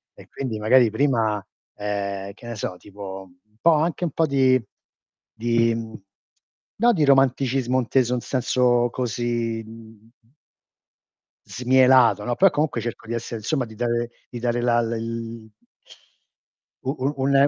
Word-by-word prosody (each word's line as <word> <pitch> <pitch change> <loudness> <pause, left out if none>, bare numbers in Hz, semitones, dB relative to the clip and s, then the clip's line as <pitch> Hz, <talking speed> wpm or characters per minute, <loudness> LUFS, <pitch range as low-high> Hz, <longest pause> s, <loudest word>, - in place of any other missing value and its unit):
e - - -15
quindi 120 -6 -4
magari 115 +2 +5
prima, 110 -5 +1 0.3
ehm, 100 -1 -3
che 120 +4 -13
ne 120 - -5
so, 100 -3 -4
tipo 95 -1 -9 0.2
un 105 +1 -35
po' 165 -1 +5
anche 160 +3 0
un 165 - -2
po' 160 - +1
di 130 -2 +3 0.7
di, 115 0 +1
mhmm, 115 -1 -6 0.8
no 235 +2 +4
di 155 -6 +2
romanticismo 135 -2 +2
inteso 125 +1 +1
in - - -1
senso 120 -1 +1
così, 120 -2 -2
mhmm 110 0 -15 1.4
smielato, 125 -4 +4
no. 120 - -1
Però, 195 +7 +5
comunque, 145 -7 -1
cerco 115 0 -6
di 115 - -4
essere 115 0 -4
insomma 125 +4 -1
di 110 - -13
dare 120 +1 -1 0.2
di 120 - -6
dare 120 0 -1
la 120 -1 +3
l 115 0 -5 1.4
U 130 - -1
u 140 - +1
un 140 - +2
120 Hz, 145 wpm, -23 LUFS, 110-130 Hz, 1.4 s, magari